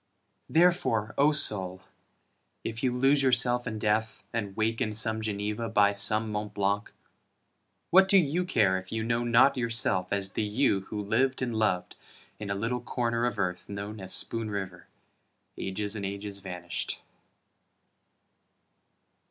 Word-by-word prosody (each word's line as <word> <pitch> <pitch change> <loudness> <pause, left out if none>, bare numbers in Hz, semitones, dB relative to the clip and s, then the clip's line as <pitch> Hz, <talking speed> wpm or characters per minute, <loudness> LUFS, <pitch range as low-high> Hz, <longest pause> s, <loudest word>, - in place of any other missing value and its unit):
Therefore, 160 -11 +2
O 145 +2 +4
soul, 95 -10 +1 0.8
if 115 +1 -4
you 130 - +1
lose 135 +3 +3
yourself 125 -1 +2
in 110 -1 -3
death, 110 +1 -1
And 105 -4 -3
wake 115 +2 0
in 110 -4 -1
some 110 +1 +1
Geneva 105 +1 -3
by 105 -2 +4
some 105 +2 +1
Mt. 105 0 -4
Blanc, 100 +1 0 1.0
What 190 +2 +7
do 195 - +5
you 170 0 +2
care 100 - +2
if 95 0 -13
you 115 0 -2
know 115 +1 0
not 120 +3 +4
yourself 115 -6 0
as 100 -1 -1
the - - -2
you 105 0 +1
Who 105 - -4
lived 130 +6 +1
and 120 -2 -2
loved 105 -5 0 0.4
in 105 -1 -6
a 100 - -1
little 115 +5 -2
corner 120 -1 -1
of 120 - -3
earth 90 +2 -2
Known 100 +1 -6
as 95 0 -7
Spoon 115 -1 0
River 95 -4 -5 0.7
ages 105 +2 -3
and 105 - -5
ages 100 +1 -4
vanished? 90 -2 -5
110 Hz, 150 wpm, -28 LUFS, 100-120 Hz, 1.0 s, What